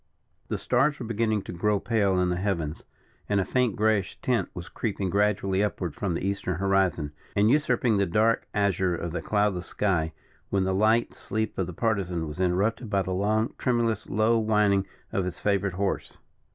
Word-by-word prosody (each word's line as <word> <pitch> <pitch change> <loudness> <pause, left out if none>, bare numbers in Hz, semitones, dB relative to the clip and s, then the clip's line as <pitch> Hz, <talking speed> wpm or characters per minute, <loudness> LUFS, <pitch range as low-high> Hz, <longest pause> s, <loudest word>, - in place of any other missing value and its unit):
The - - -2
stars 150 +1 +1
were 125 - -5
beginning 110 -2 0
to - - -7
grow 105 +4 +1
pale 100 -5 +1
in 90 0 +2
the 90 - 0
heavens, 85 -5 -2 0.4
and 100 -1 +2
a 95 - +1
faint 125 -4 +1
greyish 105 -3 +1
tint 125 -2 0
was 85 -1 -6
creeping 100 -4 -3
gradually 100 -1 +1
upward 90 -6 -2
from 95 -5 -2
the 90 - -3
Eastern 100 -2 -1
horizon, 95 -5 +1 0.2
and 105 +3 +4
usurping 125 -6 +2
the 100 -1 +2
dark 110 +6 +2
azure 95 -3 +1
of 85 0 -4
the 90 - -3
cloudless 105 -4 0
sky, 85 -6 0 0.4
when 100 -1 +1
the 95 0 0
light 110 +4 +2
sleep 110 0 -3
of 95 - 0
the - - -5
Partisan 90 -5 -1
was 75 +3 -7
interrupted 100 +6 0
by 100 -2 +1
the 95 - -4
long, 110 +4 +1
tremulous, 115 -4 0
low, 110 +3 +3
whining 105 -3 +2 0.2
of 95 - 0
his 90 -1 -5
favourite 100 -2 0
horse. 100 +1 -2
100 Hz, 185 wpm, -27 LUFS, 95-110 Hz, 0.4 s, and